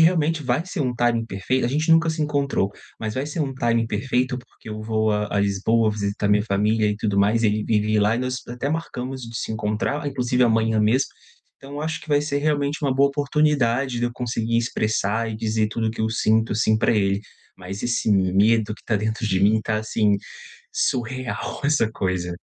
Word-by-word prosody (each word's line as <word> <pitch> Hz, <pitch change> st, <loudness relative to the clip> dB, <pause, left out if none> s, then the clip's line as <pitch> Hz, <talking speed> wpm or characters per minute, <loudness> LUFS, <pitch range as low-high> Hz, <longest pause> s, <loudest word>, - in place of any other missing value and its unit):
realmente 160 Hz, -2 st, +3 dB
vai 130 Hz, +5 st, 0 dB
ser 180 Hz, -3 st, -4 dB
um 125 Hz, -3 st, 0 dB
timing 120 Hz, -1 st, +1 dB
perfeito 115 Hz, +6 st, -1 dB
a -, -, -1 dB
gente 155 Hz, +5 st, -1 dB
nunca 165 Hz, 0 st, +4 dB
se 160 Hz, -, -4 dB
encontrou. 140 Hz, -9 st, 0 dB, 0.3 s
Mas 110 Hz, -1 st, -4 dB
vai 130 Hz, +2 st, -2 dB
ser 150 Hz, +3 st, -6 dB
um 135 Hz, -3 st, -2 dB
timing 115 Hz, -2 st, +1 dB
perfeito, 125 Hz, +4 st, -1 dB
porque 120 Hz, -2 st, -15 dB
eu 110 Hz, 0 st, -6 dB
vou 110 Hz, -1 st, +1 dB
à 105 Hz, 0 st, -1 dB
à -, -, +3 dB
Lisboa 100 Hz, +3 st, +2 dB
visitar 100 Hz, -1 st, -2 dB
minha 105 Hz, 0 st, +4 dB
família 105 Hz, +1 st, +1 dB
e 105 Hz, -, -1 dB
tudo 105 Hz, -1 st, -1 dB
mais, 110 Hz, +3 st, +3 dB
ele 105 Hz, 0 st, +2 dB
vive 110 Hz, 0 st, +1 dB
lá 105 Hz, +3 st, +3 dB
e -, -, -2 dB
nós 130 Hz, 0 st, -2 dB
até 125 Hz, +3 st, -3 dB
marcamos 130 Hz, -5 st, -4 dB
de 115 Hz, 0 st, -7 dB
se -, -, -4 dB
encontrar, 110 Hz, +7 st, -2 dB
inclusive 125 Hz, -2 st, 0 dB
amanhã 110 Hz, -2 st, +3 dB
mesmo. 115 Hz, +6 st, +3 dB, 0.6 s
Então, 140 Hz, +1 st, -10 dB
eu 145 Hz, -, -4 dB
acho 160 Hz, +1 st, -3 dB
que -, -, -15 dB
vai 145 Hz, -1 st, +3 dB
ser 145 Hz, -1 st, -1 dB
realmente 145 Hz, 0 st, 0 dB
uma 135 Hz, -2 st, +1 dB
boa 140 Hz, +1 st, +4 dB
oportunidade 140 Hz, -4 st, +1 dB
de 120 Hz, -, 0 dB
eu -, -, -3 dB
conseguir 115 Hz, -2 st, -1 dB
expressar 110 Hz, -1 st, 0 dB
e 110 Hz, -, -5 dB
dizer 110 Hz, -1 st, 0 dB
tudo 110 Hz, 0 st, -1 dB
o -, -, -1 dB
que 110 Hz, -, -7 dB
eu 110 Hz, -, +1 dB
sinto 110 Hz, 0 st, +2 dB
assim 110 Hz, 0 st, +2 dB
pra -, -, +2 dB
ele. 100 Hz, -2 st, +1 dB, 0.4 s
Mas 95 Hz, +2 st, -7 dB
esse 120 Hz, -2 st, 0 dB
medo 105 Hz, +3 st, +3 dB
que -, -, -20 dB
tá 110 Hz, -, +1 dB
dentro 110 Hz, +2 st, -2 dB
de 95 Hz, -3 st, +1 dB
mim 105 Hz, +2 st, +4 dB
tá 110 Hz, -, -1 dB
assim, 105 Hz, -2 st, +1 dB, 0.6 s
surreal, 130 Hz, +2 st, -2 dB
essa 140 Hz, -6 st, +3 dB
coisa. 90 Hz, -4 st, -2 dB
115 Hz, 210 wpm, -23 LUFS, 105-135 Hz, 0.6 s, nunca